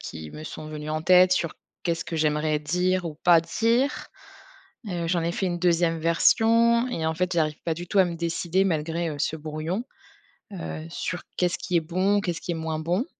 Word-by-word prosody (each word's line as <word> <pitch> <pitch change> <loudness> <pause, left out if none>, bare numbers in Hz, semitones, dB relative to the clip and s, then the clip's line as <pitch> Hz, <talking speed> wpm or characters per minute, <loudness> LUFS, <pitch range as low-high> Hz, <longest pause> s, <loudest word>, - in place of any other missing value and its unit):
qui 80 -2 -8
me 155 - -9
sont 155 0 -7
venues 150 0 -6
en 155 0 -2
tête 180 +1 +6
sur: 170 -3 0 0.3
«Qu'est-ce 170 -1 -1
que 165 - -4
j'aimerais 150 0 +1
dire 180 +4 0
ou 160 - -4
pas 175 -2 +7
dire.». 230 - 0 0.8
Heu, 170 -2 -2
j'en 170 -1 +1
ai 170 - 0
fait 190 - -2
une 175 -1 -1
2e 170 -2 +2
version 230 +8 +4
et 165 -10 -2
en 160 - +1
fait, 180 +2 -1
j'arrive 155 -2 0
pas 165 - 0
du 175 +2 -7
tout 200 - +2
à 185 - +6
me 170 - -4
décider 170 +2 0
malgré, 165 -1 -1
heu, 150 - -5
ce 160 +2 -1
brouillon, 155 +9 -4 0.7
heu, 165 -3 -6
sur 180 +1 -4
qu'est-ce 180 -1 +1
qui 180 - -1
est 170 - +4
bon, 185 +5 +1
qu'est-ce 175 -4 -3
qui - - -5
est - - -2
moins 160 -1 -3
bon? 175 - 0
170 Hz, 210 wpm, -25 LUFS, 160-185 Hz, 0.8 s, pas